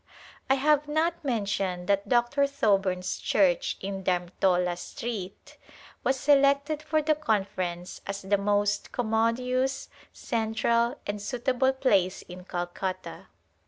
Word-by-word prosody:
I 270 Hz, -, +5 dB
have 295 Hz, +1 st, +2 dB
not 320 Hz, +3 st, 0 dB
mentioned 200 Hz, -7 st, -1 dB
that 200 Hz, 0 st, +1 dB
Dr. 250 Hz, +3 st, +3 dB
Thoburn's 195 Hz, -8 st, 0 dB
church 185 Hz, -4 st, +2 dB
in 195 Hz, 0 st, -4 dB
Dharmtola 180 Hz, 0 st, +1 dB
Street 195 Hz, +1 st, -7 dB, 0.5 s
was 265 Hz, 0 st, +1 dB
selected 280 Hz, +2 st, +3 dB
for 310 Hz, 0 st, 0 dB
the 310 Hz, +1 st, +3 dB
Conference 190 Hz, -, -2 dB
as 200 Hz, 0 st, -4 dB
the 200 Hz, +1 st, +1 dB
most 205 Hz, 0 st, 0 dB
commodious, 250 Hz, +3 st, 0 dB, 0.2 s
central 230 Hz, 0 st, 0 dB
and 205 Hz, 0 st, -4 dB
suitable 255 Hz, +3 st, +1 dB
place 200 Hz, -9 st, +1 dB
In 180 Hz, 0 st, -11 dB
Calcutta. 185 Hz, +1 st, -5 dB
220 Hz, 115 wpm, -27 LUFS, 190-265 Hz, 0.5 s, I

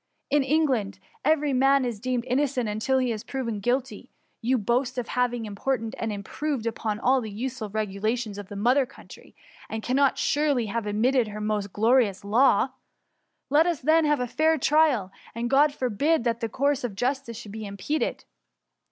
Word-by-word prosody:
In 290 Hz, 0 st, +4 dB
Eng* 305 Hz, +4 st, +2 dB
laadv 215 Hz, -7 st, -1 dB, 0.3 s
every 295 Hz, -1 st, +2 dB
man 270 Hz, +1 st, +4 dB
is 235 Hz, -4 st, -3 dB
deemed 250 Hz, +1 st, -2 dB
innocent 260 Hz, -2 st, 0 dB
until 215 Hz, +6 st, 0 dB
he 255 Hz, -2 st, +1 dB
be 215 Hz, -, -5 dB
proved 235 Hz, -6 st, -3 dB
guilty. 255 Hz, +4 st, -2 dB, 0.3 s
You 250 Hz, +3 st, +2 dB
boast 250 Hz, +4 st, 0 dB
of 245 Hz, -2 st, -3 dB
having 245 Hz, -2 st, 0 dB
imported 225 Hz, +3 st, -2 dB
and 225 Hz, -, -2 dB
improved 235 Hz, +5 st, -3 dB
upon 220 Hz, -2 st, -2 dB
all 260 Hz, +2 st, +3 dB
the 220 Hz, -, -6 dB
useful 235 Hz, +1 st, -5 dB
regulations 215 Hz, +1 st, -2 dB
of 200 Hz, -, -9 dB
the 205 Hz, -, -7 dB
mother 250 Hz, +6 st, +2 dB
country, -, -, -15 dB, 0.3 s
and 220 Hz, 0 st, -4 dB
cannot 270 Hz, +2 st, +2 dB
surely 285 Hz, -5 st, +1 dB
have 220 Hz, +1 st, -3 dB
omitted 235 Hz, +4 st, +2 dB
her 210 Hz, 0 st, -7 dB
most 210 Hz, -2 st, -2 dB
glorious 220 Hz, -2 st, +2 dB
law. 235 Hz, +3 st, +4 dB, 0.8 s
Let 310 Hz, +4 st, +5 dB
us 340 Hz, -5 st, 0 dB
then 315 Hz, +3 st, +4 dB
have 295 Hz, -2 st, +2 dB
a 250 Hz, -, 0 dB
fair 315 Hz, +6 st, +2 dB
trial, 285 Hz, -9 st, +2 dB, 0.2 s
and 235 Hz, +1 st, -3 dB
Grod 285 Hz, +2 st, +5 dB
forbid 280 Hz, +3 st, 0 dB
that 235 Hz, -1 st, 0 dB
the 230 Hz, -2 st, -2 dB
course 280 Hz, +4 st, 0 dB
Qf 235 Hz, -5 st, -4 dB
justice 250 Hz, 0 st, -2 dB
should 210 Hz, -3 st, -9 dB
be 215 Hz, 0 st, -6 dB
impeded 200 Hz, +11 st, -3 dB
245 Hz, 180 wpm, -26 LUFS, 215-275 Hz, 0.8 s, Let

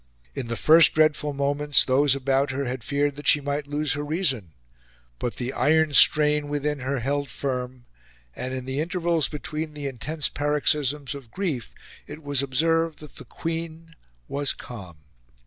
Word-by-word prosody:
In 120 Hz, -, -5 dB
the 115 Hz, -, -3 dB
first 160 Hz, +6 st, +6 dB
dreadful 155 Hz, -1 st, +2 dB
moments 145 Hz, +1 st, +2 dB
those 135 Hz, +1 st, +3 dB
about 135 Hz, +1 st, +1 dB
her 135 Hz, +1 st, -2 dB
had 125 Hz, -1 st, -4 dB
feared 145 Hz, 0 st, 0 dB
that 145 Hz, -, -7 dB
she 150 Hz, -, +5 dB
might 145 Hz, 0 st, -3 dB
lose 145 Hz, -1 st, 0 dB
her 145 Hz, 0 st, -3 dB
reason, 145 Hz, -, -1 dB, 0.7 s
but 120 Hz, -, -3 dB
the 125 Hz, +1 st, -4 dB
iron 160 Hz, 0 st, +2 dB
strain 150 Hz, 0 st, +5 dB
within 145 Hz, 0 st, -2 dB
her 135 Hz, 0 st, -2 dB
held 140 Hz, +2 st, -1 dB
firm, 125 Hz, 0 st, -4 dB, 0.5 s
and 130 Hz, -, -4 dB
in 130 Hz, -1 st, -5 dB
the 130 Hz, +2 st, -3 dB
intervals 170 Hz, -1 st, 0 dB
between 155 Hz, +1 st, -5 dB
the 145 Hz, -1 st, -6 dB
intense 140 Hz, +4 st, -2 dB
paroxysms 145 Hz, -1 st, 0 dB
of 135 Hz, -5 st, -10 dB
grief 155 Hz, -, -4 dB, 0.3 s
it 150 Hz, +2 st, -10 dB
was 145 Hz, -2 st, 0 dB
observed 165 Hz, +4 st, +1 dB
that 150 Hz, -2 st, -13 dB
the -, -, -9 dB
Queen 165 Hz, 0 st, -6 dB, 0.3 s
was 140 Hz, -1 st, -1 dB
calm. 95 Hz, -9 st, -10 dB
145 Hz, 165 wpm, -25 LUFS, 130-150 Hz, 0.7 s, first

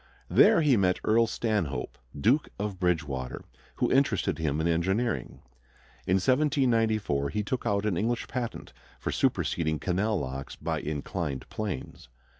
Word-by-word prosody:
There -, -, +6 dB
he 145 Hz, -6 st, +4 dB
met 90 Hz, -2 st, +2 dB
Earl 115 Hz, +1 st, +4 dB
Stanhope, 105 Hz, -, -2 dB, 0.2 s
Duke 130 Hz, -, +3 dB
of 100 Hz, -2 st, -4 dB
Bridgewater, 75 Hz, -8 st, -1 dB, 0.3 s
who -, -, 0 dB
interested 135 Hz, -9 st, +2 dB
him 75 Hz, -2 st, 0 dB
in 80 Hz, -, +1 dB
engineering. 95 Hz, +8 st, -1 dB, 0.6 s
In 90 Hz, -, +3 dB
1794 115 Hz, -, +2 dB
he 105 Hz, +8 st, -2 dB
took 125 Hz, +5 st, -3 dB
out 100 Hz, 0 st, +1 dB
an 100 Hz, -5 st, 0 dB
English 115 Hz, +5 st, -1 dB
patent 120 Hz, -2 st, -5 dB, 0.3 s
for -, -, -3 dB
superseding 80 Hz, -2 st, 0 dB
canal 100 Hz, +6 st, 0 dB
locks 65 Hz, +1 st, -5 dB
by -, -, -2 dB
inclined 75 Hz, -2 st, -4 dB
planes. 95 Hz, -, -5 dB
100 Hz, 135 wpm, -28 LUFS, 80-115 Hz, 0.6 s, There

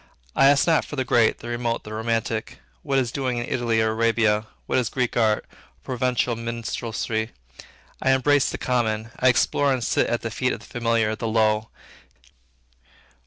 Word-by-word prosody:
I 135 Hz, -, +6 dB
ask 140 Hz, 0 st, +5 dB
not 165 Hz, -2 st, +3 dB
for -, -, -8 dB
the 130 Hz, -2 st, -1 dB
great, 120 Hz, -3 st, +3 dB
the -, -, -8 dB
remote, 120 Hz, 0 st, -2 dB
the 110 Hz, -, -8 dB
romantic; 115 Hz, 0 st, -2 dB, 0.2 s
what 135 Hz, -, 0 dB
is 125 Hz, -3 st, +1 dB
doing 130 Hz, -3 st, -2 dB
in 120 Hz, -, -2 dB
Italy 115 Hz, -3 st, 0 dB
or 110 Hz, -, +1 dB
Arabia; 110 Hz, -1 st, +2 dB, 0.2 s
what -, -, +1 dB
is 120 Hz, -, -1 dB
Greek 125 Hz, -2 st, -1 dB
art, 110 Hz, -2 st, +2 dB
or -, -, -25 dB, 0.3 s
Provencal 125 Hz, -1 st, 0 dB
minstrelsy; 115 Hz, -1 st, -3 dB, 0.7 s
I -, -, +1 dB
embrace 135 Hz, +1 st, +3 dB
the -, -, -4 dB
common, 115 Hz, -3 st, -1 dB
I 130 Hz, -, +3 dB
explore 140 Hz, +3 st, +3 dB
and 130 Hz, -3 st, 0 dB
sit -, -, +1 dB
at 120 Hz, -, -1 dB
the 115 Hz, -, -3 dB
feet 125 Hz, +3 st, 0 dB
of -, -, -5 dB
the -, -, -13 dB
familiar, 115 Hz, -2 st, 0 dB
the 115 Hz, +1 st, -4 dB
low. 110 Hz, -1 st, +1 dB
115 Hz, 180 wpm, -24 LUFS, 110-125 Hz, 0.7 s, I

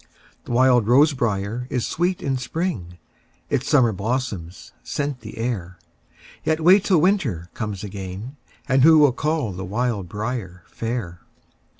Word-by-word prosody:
The -, -, -7 dB
wild 125 Hz, -2 st, +4 dB
rose 140 Hz, +6 st, +5 dB
briar 115 Hz, 0 st, -2 dB
is 125 Hz, -3 st, -1 dB
sweet 175 Hz, +2 st, -1 dB
in 135 Hz, -1 st, 0 dB
spring, 125 Hz, -, -3 dB, 0.5 s
Its 135 Hz, -, 0 dB
summer 130 Hz, -6 st, +4 dB
blossoms 100 Hz, -5 st, -4 dB
scent 145 Hz, -3 st, -3 dB
the 110 Hz, -2 st, -10 dB
air; 100 Hz, -6 st, -3 dB, 0.7 s
Yet 160 Hz, 0 st, +1 dB
wait 185 Hz, +5 st, +5 dB
till 185 Hz, -5 st, +4 dB
winter 140 Hz, -, 0 dB
comes 105 Hz, -3 st, -4 dB
again, 100 Hz, +5 st, -7 dB, 0.3 s
And 130 Hz, 0 st, +3 dB
who 160 Hz, +3 st, +7 dB
will 145 Hz, -4 st, +5 dB
call 150 Hz, -4 st, -1 dB
the 95 Hz, +1 st, -6 dB
wild 105 Hz, -1 st, -2 dB
briar 105 Hz, -4 st, -5 dB
fair? 115 Hz, -7 st, -4 dB
120 Hz, 140 wpm, -22 LUFS, 100-140 Hz, 0.7 s, who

